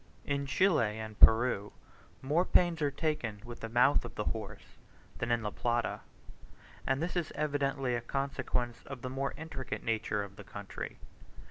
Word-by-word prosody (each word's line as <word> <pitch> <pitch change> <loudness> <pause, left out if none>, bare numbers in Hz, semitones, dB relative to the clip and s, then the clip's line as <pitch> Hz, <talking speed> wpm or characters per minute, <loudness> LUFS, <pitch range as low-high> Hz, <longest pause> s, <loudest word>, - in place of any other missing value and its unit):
In 140 0 -1
Chile 135 - +3
and 110 -1 -7
Peru 110 -3 +5 0.5
more 150 +6 +3
pains 175 -3 +3
are 145 - +3
taken 140 -8 -2
with 120 0 -8
the 115 - -5
mouth 125 +5 +4
of - - -8
the 105 - -1
horse 105 -2 -5 0.4
than 115 - -1
in 120 -1 +2
La 105 - -2
Plata, 120 +1 0 0.9
and 135 +3 +1
this 175 - -2
is 175 -4 -1
evidently 140 -3 0
a 120 - 0
consequence 125 -2 -2
of 135 -2 -7
the 130 - -3
more 135 +1 -2
intricate 150 -5 -5
nature 110 -2 0
of 100 0 -10
the - - -8
country. - - -7
125 Hz, 165 wpm, -32 LUFS, 115-145 Hz, 0.9 s, Peru